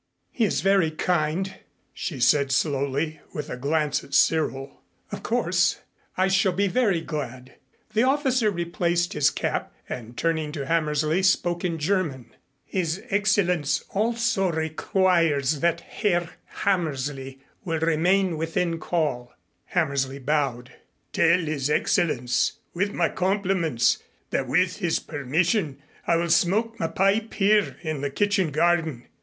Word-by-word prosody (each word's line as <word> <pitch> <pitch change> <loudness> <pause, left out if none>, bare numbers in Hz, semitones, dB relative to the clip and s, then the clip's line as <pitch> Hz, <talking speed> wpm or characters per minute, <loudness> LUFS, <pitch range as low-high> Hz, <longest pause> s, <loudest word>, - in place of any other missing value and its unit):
"He 230 - +1
is - - 0
very 195 -4 +3
kind," 175 +3 -1 0.4
she 145 -8 -5
said 140 +2 +3
slowly 140 +2 0 0.2
with 150 - -5
a - - -3
glance 150 +3 0
at 140 - -5
Cyril. 140 -4 +1 0.3
"Of - - -5
course - - +1 0.4
I 185 +1 +3
shall 190 0 +2
be 200 +3 +1
very 200 -6 +1
glad." 130 -5 -6 0.4
The 220 - +3
officer 260 -3 +2
replaced 175 -1 -1
his 145 -1 +3
cap - - -3 0.2
and, 120 -1 -7
turning 160 -2 0
to 140 -4 -4
Hammersley, 155 +2 +1
spoke 175 -2 +1
in 170 -2 -1
German. 150 - -1 0.3
"His 180 -1 -2
Excellenz 180 -7 +1
also 225 -3 +1
requests 160 -2 +1
that 170 +1 +1
Herr 175 -3 -1 0.2
Hammersley 140 -7 -2 0.2
will 165 -4 -1
remain 170 +2 +2
within 165 +1 -1
call." 145 -9 -2 0.3
Hammersley 140 -6 -1
bowed. 135 -3 -1 0.4
"Tell 170 +1 +4
his 150 -4 -2
Excellenz 125 -5 +1 0.2
with 200 +4 0
my - - +1
compliments 185 - +1 0.3
that - - -1
with 185 0 +1
his 175 -5 0
permission 155 - -1 0.3
I 170 - +4
will 170 0 0
smoke 225 +7 +2
my 165 - 0
pipe 195 +6 +1
here 210 0 +2
in 155 -4 -3
the 140 - -1
kitchen 195 +3 +1
garden." 160 -4 +1
165 Hz, 130 wpm, -25 LUFS, 145-190 Hz, 0.4 s, Tell